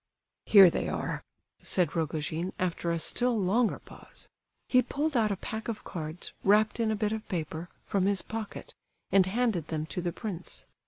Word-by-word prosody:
"Here 195 -4 +9
they - - -2
are," - - -3 0.4
said 180 -4 +1
Rogojin, 160 +2 -2
after 175 -1 -1
a 170 - +1
still 240 +7 +2
longer 210 +5 +2
pause. - - -13 0.4
He 255 - +5
pulled 295 +3 -2
out 220 -3 +3
a - - +1
pack 220 +4 -5
of 230 -2 -4
cards, 160 -1 -6
wrapped 210 +3 +4
in 225 -1 +2
a 220 - +1
bit 210 0 0
of 220 -1 -4
paper, 165 -1 -4 0.2
from 195 -1 +1
his 200 -1 +1
pocket, 220 -1 -6 0.4
and 190 -1 +5
handed 210 -6 0
them 155 -1 -2
to 160 +4 -4
the 175 0 -1
prince. 185 -3 -7
195 Hz, 175 wpm, -29 LUFS, 170-220 Hz, 0.4 s, Here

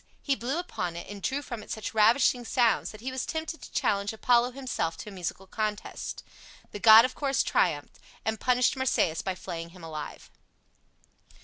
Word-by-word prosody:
He 275 - +1
blew 265 +5 -2
upon 180 - -3
it, 170 - -7
and 205 -1 -8
drew 275 +6 -1
from 235 -5 -6
it - - -14
such 220 +3 -4
ravishing 235 +3 +4
sounds 235 -2 +2
that 215 - -11
he 260 +2 -4
was 260 0 -3
tempted 320 0 -4
to - - -11
challenge 200 0 0
Apollo 240 +2 +3
himself 245 -12 -2
to - - -8
a - - -11
musical 185 +1 -5
contest. 215 +1 -4 0.5
The 205 - -6
god 220 +2 +9
of 255 - -3
course 275 -2 0
triumphed, 155 -5 0 0.3
and 220 0 -1
punished 250 +1 +3
Marsyas 245 -11 +1
by 190 -1 -3
flaying 170 -2 -6
him 175 - -13
alive. 155 -2 -7
220 Hz, 185 wpm, -28 LUFS, 190-255 Hz, 0.5 s, god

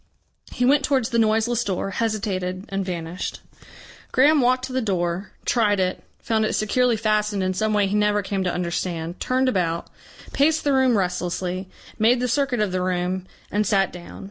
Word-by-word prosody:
He 250 - 0
went 280 +2 +4
towards 265 -5 +1
the 235 -2 +1
noiseless 225 +2 +2
door, 195 -1 -2
hesitated 195 -3 -2
and 195 0 -2
vanished. 175 -1 -5 0.7
Graham 290 +3 +5
walked 255 +1 +2
to 260 - -8
the 260 - +1
door, 180 -2 -1 0.2
tried 210 -4 +2
it, 185 0 -1
found 220 -1 0
it 215 - 0
securely 240 +2 +2
fastened 210 -2 0
in 185 0 0
some 215 +3 0
way 205 -1 +3
he 195 - -2
never 210 0 +2
came 195 0 -2
to 180 - +1
understand, 170 -1 -3
turned 260 +1 +1
about, 170 -8 -1 0.4
paced 310 +3 +2
the 285 - +2
room 260 -3 +4
restlessly, 180 0 -2 0.3
made 235 +3 +4
the 250 - 0
circuit 250 -2 +1
of 210 -3 0
the 185 0 -1
room, 180 0 -1 0.2
and 210 +1 +1
sat 195 -2 +2
down. 175 -1 -10
210 Hz, 180 wpm, -23 LUFS, 185-240 Hz, 0.7 s, Graham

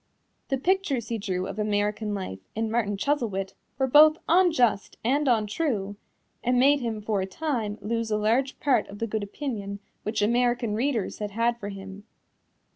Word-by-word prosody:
The 270 - 0
pictures 285 - 0
he 230 -1 -2
drew 185 -3 -2
of 195 +2 -6
American 210 0 0
life 185 - -5 0.2
in 220 0 -1
Martin 210 -3 0
Chuzzlewit 205 -7 -1 0.2
were 265 - +2
both 305 +4 +7
unjust 320 - +3
and 280 +5 +2
untrue, 215 -2 0 0.5
and 250 +1 +2
made 280 +3 +5
him 225 -4 -3
for 210 -2 0
a 190 - -2
time 225 -4 -2
lose 230 +1 -1
a 210 - +1
large 235 +6 +1
part 275 -3 +2
of 200 - -10
the 230 - -1
good 220 -1 -2
opinion 205 -2 -5 0.2
which 215 0 -1
American 240 0 +2
readers 235 -1 -1
had 210 -1 -3
had 230 +3 0
for 205 - -5
him. 195 +1 -9
225 Hz, 170 wpm, -26 LUFS, 205-260 Hz, 0.5 s, both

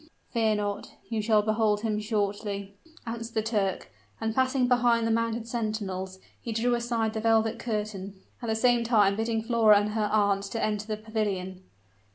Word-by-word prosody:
"Fear 220 -3 +2
not, 205 0 -4
you 225 -2 -1
shall 215 -1 +3
behold 215 -1 +1
him 215 -2 -1
shortly," 205 -2 -2 0.3
answered 230 0 -6
the 220 - +1
Turk; 205 - -1 0.3
and 225 0 -1
passing 260 0 +2
behind 240 -2 +3
the 225 - +1
mounted 230 0 -1
sentinels, 205 -5 -3 0.2
he 230 - -5
drew 235 +2 +1
aside 235 -2 0
the 220 - -2
velvet 225 0 +2
curtain, 210 -3 -4 0.3
at 235 - -5
the 220 - +1
same 240 +1 +3
time 210 -4 +3
bidding 225 +1 -1
Flora 225 -3 +5
and 205 +1 -1
her 210 -1 -1
aunt 200 -2 +2
enter 215 -1 -1
the 215 -1 -2
pavilion. 205 -4 -3
220 Hz, 170 wpm, -27 LUFS, 205-230 Hz, 0.3 s, Flora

